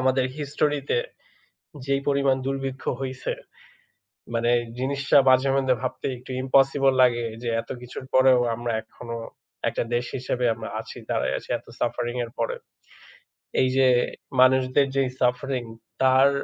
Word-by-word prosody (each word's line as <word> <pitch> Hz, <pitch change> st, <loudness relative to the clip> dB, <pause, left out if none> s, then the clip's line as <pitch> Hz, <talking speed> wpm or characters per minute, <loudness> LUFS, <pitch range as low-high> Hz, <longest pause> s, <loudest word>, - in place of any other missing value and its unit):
আমাদের 130 Hz, 0 st, +2 dB
হিস্টোরিতে 145 Hz, -, 0 dB, 0.9 s
যেই 140 Hz, 0 st, +1 dB
পরিমাণ 140 Hz, -1 st, +3 dB
দুর্ভিক্ষ 135 Hz, -1 st, -3 dB, 0.2 s
হইছে। 130 Hz, -1 st, -3 dB, 1.0 s
মানে 120 Hz, +1 st, +2 dB, 0.3 s
জিনিসটা 140 Hz, +2 st, +2 dB
মাঝে 130 Hz, +1 st, +4 dB
মধ্যে 130 Hz, -2 st, +2 dB
ভাবতে 130 Hz, -, -3 dB
একটু 125 Hz, +1 st, -11 dB
ইম্পসিবল 135 Hz, +1 st, +4 dB
লাগে 120 Hz, -1 st, +2 dB, 0.2 s
যে 120 Hz, -, -1 dB
এত 115 Hz, -, -21 dB
কিছুর 125 Hz, +1 st, -8 dB
পরেও 130 Hz, -1 st, +6 dB, 0.2 s
আমরা 120 Hz, +1 st, -3 dB
এখনো 115 Hz, +1 st, -9 dB, 0.5 s
একটা -, -, -2 dB
দেশ 120 Hz, +1 st, +1 dB
হিসেবে 125 Hz, 0 st, -2 dB
আমরা 110 Hz, 0 st, -7 dB
আছি, 110 Hz, -, -9 dB
দাঁড়ায় -, -, 0 dB
আছি -, -, -10 dB
এত -, -, -27 dB
সাফারিং 120 Hz, +1 st, -1 dB
এর 115 Hz, -, -13 dB
পরে। -, -, 0 dB, 1.1 s
এই 130 Hz, -, +3 dB
যে 135 Hz, -1 st, +5 dB, 0.5 s
মানুষদের 130 Hz, +1 st, +4 dB
যেই 135 Hz, -2 st, +2 dB
সাফারিং 125 Hz, 0 st, 0 dB, 0.4 s
তার 130 Hz, +1 st, +6 dB
130 Hz, 135 wpm, -25 LUFS, 125-135 Hz, 1.1 s, পরেও